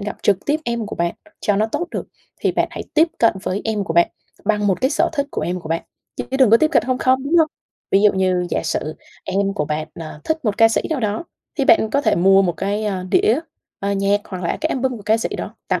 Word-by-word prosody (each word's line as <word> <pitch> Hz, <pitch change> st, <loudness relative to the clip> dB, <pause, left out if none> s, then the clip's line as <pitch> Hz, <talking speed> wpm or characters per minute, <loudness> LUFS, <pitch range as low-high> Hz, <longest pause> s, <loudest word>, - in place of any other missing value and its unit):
gặp 205 Hz, +1 st, -4 dB
trực 195 Hz, -2 st, +2 dB
tiếp 300 Hz, +2 st, +1 dB
em 235 Hz, -2 st, -2 dB
của -, -, -6 dB
bạn 170 Hz, 0 st, 0 dB, 0.3 s
cho 205 Hz, -1 st, +1 dB
nó 215 Hz, -, +2 dB
tốt 345 Hz, +10 st, -3 dB
được? -, -, -4 dB, 0.4 s
Thì -, -, +1 dB
bạn -, -, +1 dB
hãy -, -, -6 dB
tiếp 320 Hz, +2 st, +5 dB
cận 230 Hz, -, +5 dB
với 190 Hz, +2 st, -2 dB
em 215 Hz, -3 st, -1 dB
của 165 Hz, -, -3 dB
bạn 170 Hz, 0 st, +5 dB, 0.4 s
bằng 210 Hz, 0 st, +1 dB
một 190 Hz, +2 st, +1 dB
cái 260 Hz, -, +2 dB
sở -, -, +2 dB
thích 285 Hz, -2 st, -1 dB
của -, -, -3 dB
em 180 Hz, +1 st, -2 dB
của 160 Hz, -, -9 dB
bạn, 165 Hz, 0 st, -1 dB, 0.3 s
chứ -, -, -3 dB
đừng 260 Hz, -5 st, +5 dB
có 230 Hz, -, +8 dB
tiếp 310 Hz, +5 st, +3 dB
cận -, -, +4 dB
không 255 Hz, -1 st, 0 dB
không, 260 Hz, 0 st, +2 dB
đúng 325 Hz, +5 st, +2 dB
hông? 315 Hz, -1 st, +4 dB, 0.4 s
Ví 195 Hz, -, +4 dB
dụ 210 Hz, -, +6 dB
như 185 Hz, -2 st, +1 dB
giả -, -, 0 dB
sử 155 Hz, -1 st, -2 dB, 0.3 s
em 195 Hz, +1 st, 0 dB
của 150 Hz, -, -1 dB
bạn, 155 Hz, +1 st, -3 dB
ờ, 155 Hz, -2 st, -8 dB
thích 315 Hz, -2 st, -1 dB
một 210 Hz, -2 st, 0 dB
ca 225 Hz, -1 st, +7 dB
sĩ 225 Hz, -, +1 dB
nào 305 Hz, -4 st, 0 dB
đó, 215 Hz, +8 st, -1 dB, 0.3 s
thì 275 Hz, -, +2 dB
bạn 220 Hz, -3 st, +4 dB
có 280 Hz, -, +2 dB
thể -, -, +2 dB
mua 195 Hz, +3 st, +5 dB
một 175 Hz, -, +1 dB
cái, 205 Hz, +3 st, -1 dB
a, 195 Hz, -3 st, -2 dB
đĩa, 230 Hz, +5 st, +4 dB, 0.4 s
ờ, 200 Hz, 0 st, -1 dB
nhạc, 200 Hz, +1 st, +2 dB
hoặc 185 Hz, -2 st, -7 dB
là 170 Hz, -, -1 dB
cái 315 Hz, -, 0 dB
album 260 Hz, -3 st, -1 dB
của 210 Hz, -, -11 dB
ca 215 Hz, +2 st, +3 dB
sĩ 225 Hz, -, -2 dB
đó -, -, -6 dB
tặng -, -, +1 dB
210 Hz, 275 wpm, -20 LUFS, 190-255 Hz, 0.4 s, có